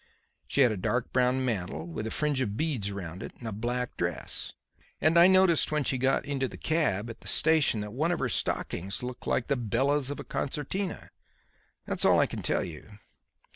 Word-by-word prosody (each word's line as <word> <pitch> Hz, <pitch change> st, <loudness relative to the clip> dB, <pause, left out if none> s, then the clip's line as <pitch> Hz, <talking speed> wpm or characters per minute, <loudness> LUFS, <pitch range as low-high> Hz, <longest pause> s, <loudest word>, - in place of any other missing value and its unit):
She 140 Hz, -, +2 dB
had 125 Hz, -4 st, +6 dB
a 105 Hz, -, -2 dB
dark 120 Hz, +6 st, -1 dB
brown 130 Hz, +1 st, +2 dB
mantle 90 Hz, -, -2 dB
with 85 Hz, +6 st, -5 dB
a -, -, -2 dB
fringe 145 Hz, +1 st, 0 dB
of 105 Hz, -4 st, -2 dB
beads 130 Hz, -11 st, -1 dB
round 95 Hz, -2 st, -6 dB
it -, -, -7 dB
and 120 Hz, -, -8 dB
a -, -, -3 dB
black 120 Hz, +4 st, -2 dB
dress; 85 Hz, -5 st, -3 dB, 0.5 s
and 160 Hz, +2 st, +3 dB
I 170 Hz, +1 st, +8 dB
noticed 185 Hz, -5 st, +4 dB
when 150 Hz, -1 st, +1 dB
she 130 Hz, -1 st, 0 dB
got 135 Hz, +1 st, +2 dB
into 135 Hz, -2 st, -1 dB
the -, -, -10 dB
cab 150 Hz, -, +1 dB
at 115 Hz, -, -13 dB
the -, -, -12 dB
station 155 Hz, -9 st, +3 dB
that 105 Hz, 0 st, -6 dB
one 155 Hz, +7 st, +1 dB
of 175 Hz, -, +1 dB
her 135 Hz, -, 0 dB
stockings 100 Hz, -1 st, -2 dB
looked 125 Hz, 0 st, -6 dB
like 120 Hz, -, +1 dB
the 140 Hz, -, +1 dB
bellows 130 Hz, +4 st, +1 dB
of 145 Hz, -, -4 dB
a -, -, -5 dB
concertina. 175 Hz, +7 st, -3 dB, 0.7 s
That's -, -, -1 dB
all -, -, +5 dB
I -, -, +5 dB
can -, -, -5 dB
tell -, -, +1 dB
you." 85 Hz, +6 st, -10 dB
125 Hz, 210 wpm, -29 LUFS, 105-145 Hz, 0.7 s, I